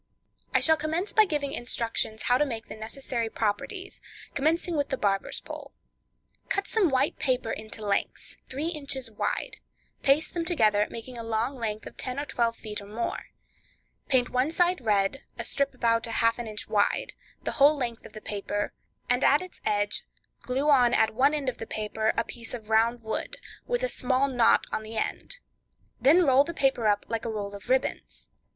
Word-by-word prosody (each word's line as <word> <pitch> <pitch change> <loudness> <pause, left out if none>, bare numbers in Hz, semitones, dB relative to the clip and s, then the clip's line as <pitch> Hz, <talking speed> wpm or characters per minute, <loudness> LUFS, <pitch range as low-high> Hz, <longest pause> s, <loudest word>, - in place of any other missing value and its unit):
I - - +3
shall 320 0 +5
commence 320 +6 -2
by 435 -2 +6
giving 295 -6 -2
instructions 230 -2 -1
how 250 +1 +3
to - - +5
make 225 -3 -5
the - - -7
necessary 230 +1 -3
properties, 295 - -3 0.3
commencing 330 +4 +1
with 285 -2 0
the 265 - -1
Barber's 195 -3 0
Pole. - - -9 0.8
Cut 395 - 0
some 415 -7 +2
white 265 +1 +1
paper 255 -6 +1
into 215 0 -6
lengths, 200 -1 -1
three 290 +5 -2
inches 275 -7 -3
wide; 210 - -2 0.4
paste 280 +3 +3
them 340 - -1
together, 215 - +3
making 235 +1 -7
a - - -4
long 225 +4 -1
length 220 -3 -3
of - - -10
ten 255 +1 -2
or 290 - -2
twelve 235 -4 0
feet 210 -2 -6
or 200 - -11
more; 220 +3 -3 0.8
paint 255 -3 +2
one 255 +3 +2
side 355 0 +2
red, 205 +3 +1 0.2
a - - -2
strip 280 -1 +1
about 230 -1 +1
half 230 +1 +2
an 240 - -4
inch 215 -1 -5
wide, 210 -1 +1 0.3
the - - -1
whole 290 +1 +5
length 240 -4 -3
of - - -12
the 215 - -8
paper, 205 0 -3 0.3
and 245 +2 +2
at 290 +6 +5
its 365 - -12
edge; 205 0 +1 0.4
glue 265 +4 -1
on 245 -4 +5
at 220 0 +3
one 275 +6 +3
end 285 -3 -3
of 255 - -2
the 225 - -6
paper 220 +1 -1
a 230 - +3
piece 235 0 -7
of 220 -2 -10
round 230 +2 +3
wood, 220 - -3 0.3
with 485 0 0
a - - +3
small 260 - +1
knot 245 -4 +4
on - - -1
the 220 +1 -7
end; - - -3 0.6
then 335 +6 +6
roll 270 0 +6
the 340 +3 -6
paper 265 -6 +2
up 205 -1 +2
like 230 -1 -2
a 230 - -3
roll 205 -2 -4
of 200 - -10
ribbons. 260 +1 -1
245 Hz, 190 wpm, -27 LUFS, 220-280 Hz, 0.8 s, by